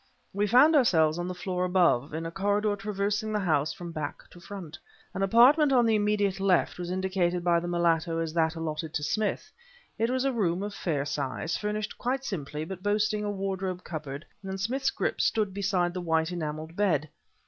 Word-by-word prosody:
We 205 +2 +1
found 270 +9 +6
ourselves 165 - +4
on 175 - -2
the 180 - -4
floor 180 0 -2
above, 175 -8 +2
in 160 +2 -4
a 165 - -4
corridor 205 +3 +1
traversing 205 +1 -2
the 210 - 0
house 155 -6 +1
from 175 -1 -8
back 155 -3 -5
to 175 - -14
front. 175 -3 -9 0.3
An 195 - -3
apartment 255 +9 +5
on 245 -3 +5
the 225 - +3
immediate 205 -2 +1
left 190 -2 +2
was 175 -1 -4
indicated 185 -1 0
by 170 -1 +3
the 175 - -5
mulatto 170 -1 +1
as 165 -1 -2
that 160 -1 +1
allotted 160 -1 -4
to 150 - -1
Smith. 215 - -1 0.5
It 230 +1 +2
was 260 +1 0
a 270 - +1
room 190 -5 0
of 205 0 -4
fair 150 -7 -2
size, 145 +3 -2
furnished 210 0 -3
quite 265 +2 -1
simply 150 - -4
but 185 +1 -7
boasting 210 +1 +1
a 205 - -2
wardrobe 190 -2 -3
cupboard, 150 -2 -6 0.2
and 190 0 -5
Smith's 260 +7 0
grip - - -2
stood 210 -4 +1
beside 190 -3 0
the 180 - -4
white 160 0 +1
enameled 160 -1 -5
bed. 170 -7 +1
185 Hz, 195 wpm, -28 LUFS, 165-210 Hz, 0.5 s, found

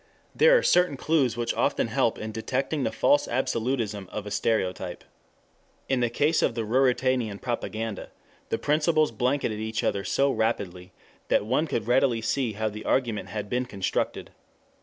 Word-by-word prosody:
There - - +6
are - - 0
certain 180 -5 +3
clues 135 -6 +1
which 120 -1 -1
often - - 0
help - - +1
in 110 0 -5
detecting 130 +7 -2
the - - 0
false 145 - +3
absolutism 115 -5 -1
of 105 - -5
a 105 - -6
stereotype. 95 -4 -1 0.8
In 135 -1 +1
the 120 -1 +1
case 150 +7 +2
of 115 - +1
the 115 -2 -2
Ruritanian 125 -3 +1
propaganda 115 -3 -4 0.4
the - - 0
principles 155 0 +2
blanketed 120 -1 -1
each 110 0 -3
other 100 - 0
so 140 +6 +2
rapidly 95 -6 -2 0.4
that - - +2
one 150 +8 +1
could 115 -7 -2
readily 125 0 +3
see 125 -2 0
how 110 +2 -2
the 105 0 -6
argument 110 -7 0
had 105 -2 -4
been 125 +4 -1
constructed. 100 -5 -2
120 Hz, 160 wpm, -26 LUFS, 105-135 Hz, 0.8 s, There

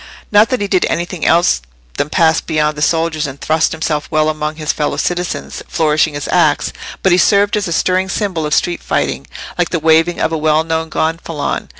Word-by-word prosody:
Not 210 +1 +5
that 255 -4 -1
he 205 - 0
did 185 -2 +2
anything 175 0 -2
else 170 - +3 0.4
than 145 - -1
pass 160 -1 +3
beyond 155 -1 0
the 150 - -6
soldiers 160 -1 +1
and 135 0 -9
thrust 160 +1 +1
himself 155 -2 -2
well 155 -1 +2
among 155 0 -3
his 155 -1 -2
fellow 150 - -2
citizens, 175 0 -3
flourishing 155 -1 +1
his 145 - -4
axe; 160 -5 +2 0.3
but 190 - +3
he 175 - +4
served 205 +3 +3
as 210 -3 -1
a - - -4
stirring 185 +3 +1
symbol 185 -7 -2
of 150 - +1
street 175 -1 0
fighting, - - -2 0.3
like 175 - +1
the 170 - -1
waving 160 +2 +3
of - - 0
a 160 - -1
well 155 0 +2
known 160 0 -2
gonfalon. 160 -1 -2
160 Hz, 205 wpm, -16 LUFS, 155-175 Hz, 0.4 s, Not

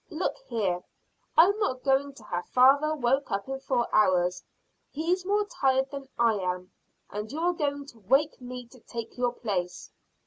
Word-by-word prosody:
"Look 340 0 -2
here, 190 -6 -1 0.6
I'm 395 +6 +6
not 255 -12 -1
going 275 +1 +2
to 240 - -15
have 175 -4 -4
father 280 +5 +5
woke 270 0 +1
up 200 +3 -2
in 270 0 -4
four 255 -3 0
hours. 180 -3 +3 0.5
He's 355 +5 -1
more 415 +1 +2
tired 265 -7 +1
than 275 -1 -7
I 230 -2 +3
am, 180 0 -3 0.4
and 210 +2 -5
you 300 - -4
are 350 +2 +2
going 285 -3 -2
to 240 -5 -15
wake 270 +9 +2
me 250 0 -7
to 255 - -16
take 230 0 -7
your 245 -1 +1
place." 185 -7 -3
260 Hz, 175 wpm, -28 LUFS, 215-285 Hz, 0.6 s, I'm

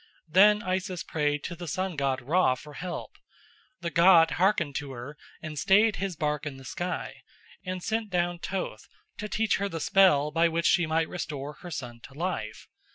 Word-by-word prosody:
Then 210 +6 +5
Isis 185 -1 -2
prayed 150 -2 -1
to 175 - -5
the 175 0 -8
sun 185 +4 -2
god 135 -3 -1
Ra 150 -1 +3
for 150 +3 -12
help. 175 +4 -6 0.6
The 170 -1 -3
god 170 +1 +6
hearkened 175 -5 +1
to 145 -2 -6
her 125 +4 -8 0.3
and 155 -2 -5
staid 205 +4 +4
his 195 -2 -3
bark 150 -1 -2
in 135 -2 -6
the 135 - -13
sky, 175 +9 -4 0.4
and 185 -1 -5
sent 220 -1 -1
down 175 -1 0
Thoth 180 - -4 0.3
to 210 - -4
teach 220 +1 +1
her 200 +1 -2
the 165 - -5
spell 150 -4 +4
by 165 +2 +3
which 165 0 -1
she 170 0 +4
might 160 +1 +1
restore 150 -4 -5
her 175 +4 -11
son 125 -6 -6
to 135 - -15
life. 150 -11 -4
170 Hz, 185 wpm, -28 LUFS, 145-185 Hz, 0.6 s, god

